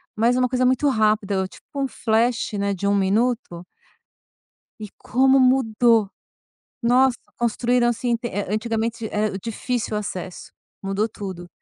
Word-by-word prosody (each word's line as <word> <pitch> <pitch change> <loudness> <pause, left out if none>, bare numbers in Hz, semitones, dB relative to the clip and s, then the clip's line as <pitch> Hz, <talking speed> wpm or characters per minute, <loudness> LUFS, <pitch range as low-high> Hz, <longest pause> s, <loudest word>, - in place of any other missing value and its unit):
mas 235 +3 +2
uma 255 -1 +1
coisa 255 0 +1
muito 260 +3 +2
rápida, 210 -5 +1
tipo - - -17
um 275 -1 0
flash, 230 0 0
né, 200 -1 -1
de 200 +2 -3
1 200 - +3
minuto 200 -2 0 1.1
e 210 - -7
como 265 +2 +3
mudou. 235 -4 +3 0.7
Nossa, 250 +2 +3 0.2
construíram, 240 +1 +1
assim, 240 0 0
te 235 +1 -5
eh, 205 -3 -4
antigamente, 225 +1 -2
é 210 -2 -1
difícil 230 +2 -3
o 210 - 0
acesso, 185 -3 -7 0.3
mudou 195 +3 0
tudo. 185 -4 -7
225 Hz, 140 wpm, -22 LUFS, 205-245 Hz, 1.1 s, 1